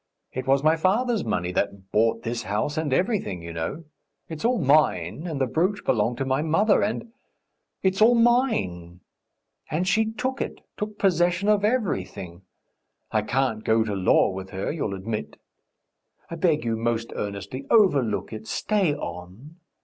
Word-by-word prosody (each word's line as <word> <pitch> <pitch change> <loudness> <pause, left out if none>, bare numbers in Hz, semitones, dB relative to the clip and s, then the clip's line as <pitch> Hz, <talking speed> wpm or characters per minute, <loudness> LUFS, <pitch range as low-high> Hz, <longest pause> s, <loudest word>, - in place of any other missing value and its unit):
It 130 0 -4
was 135 +1 +3
my 155 +1 +5
father's 220 +7 +1
money 90 -6 -1
that 95 0 -3
bought 110 +3 +2
this 115 +1 -2
house 105 +7 -2
and 155 -3 -1
everything, 180 - 0
you 85 0 -7
know! 80 - -4 0.5
It's 160 -2 -6
all 245 +2 +2
mine, 145 - +2
and 155 -5 -3
the 135 - +2
brooch 185 - 0
belonged 120 +1 +1
to 135 - -2
my 130 +2 +1
mother, 180 +7 +3
and... 225 +2 -2 0.7
it's 190 +1 +1
all 235 +3 +7
mine! 100 - +1 0.7
And 175 +4 -1
she 220 +2 +2
took 260 +4 -3
it, - - -5
took 210 0 -5
possession 180 0 +2
of 210 -1 +3
everything.... 95 - -2 0.7
I 110 - +2
can't 115 -1 -1
go 110 0 +3
to 105 -2 -3
law 95 0 +3
with 95 0 -7
her, 95 0 -3
you'll 125 -11 -3
admit.... 105 +3 -5 0.9
I - - -3
beg 160 -4 +1
you 115 -1 0
most 115 0 -2
earnestly, 105 +7 -5
overlook 140 - +3
it... 110 0 -8
stay 195 -8 +1
on. 115 - -8
135 Hz, 160 wpm, -25 LUFS, -, 0.9 s, all